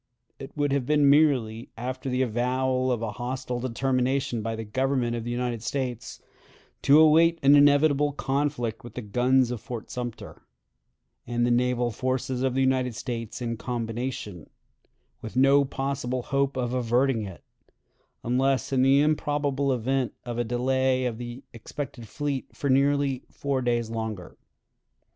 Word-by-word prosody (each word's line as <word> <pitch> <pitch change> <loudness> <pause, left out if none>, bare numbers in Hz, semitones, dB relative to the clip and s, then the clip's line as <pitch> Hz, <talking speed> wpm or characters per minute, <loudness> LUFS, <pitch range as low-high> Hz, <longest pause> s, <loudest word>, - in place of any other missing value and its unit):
It 135 +2 -10
would 145 -1 +1
have 135 -3 0
been 150 -1 +4
merely, 130 -6 +2
after 130 +3 -4
the 125 +1 +1
avowal 130 +2 0
of 115 -2 -1
a 110 - -2
hostile 125 +1 -4
determination 130 0 0
by 115 +1 -3
the 115 - -5
Government 125 +2 0
of 115 - -4
the - - -4
United 120 -1 -2
States, 125 -2 -4 0.6
to 145 +2 +6
await 165 +2 +5
an 140 +1 +7
inevitable 145 0 +5
conflict 135 -5 -2
with 120 - -11
the 125 - -5
guns 125 +4 +2
of 120 - -4
Fort 120 -4 -7
Sumter 120 -2 -6 0.9
and 120 0 0
the 120 - +1
naval 125 0 +1
forces 130 +1 -2
of 130 -1 0
the 135 - +2
United 130 -2 +1
States 115 +1 -5
in 115 -1 -3
combination; 115 - -4 0.7
with 110 - -8
no 135 +2 +5
possible 135 -2 -3
hope 140 0 0
of 125 -1 -1
averting 125 0 +1
it, 95 -7 -8 0.8
unless 130 +3 +1
in 130 - +3
the 135 +2 +5
improbable 145 -2 0
event 130 +1 0
of 120 -1 -4
a - - +2
delay 130 +2 +1
of 120 -2 -3
the 120 +2 -7
expected 120 +1 -7
fleet 145 +2 -3
for 140 - -1
nearly 140 -1 +2
four 140 -2 -2
days 120 -2 0
longer. 110 -5 -5
130 Hz, 155 wpm, -26 LUFS, 120-135 Hz, 0.9 s, an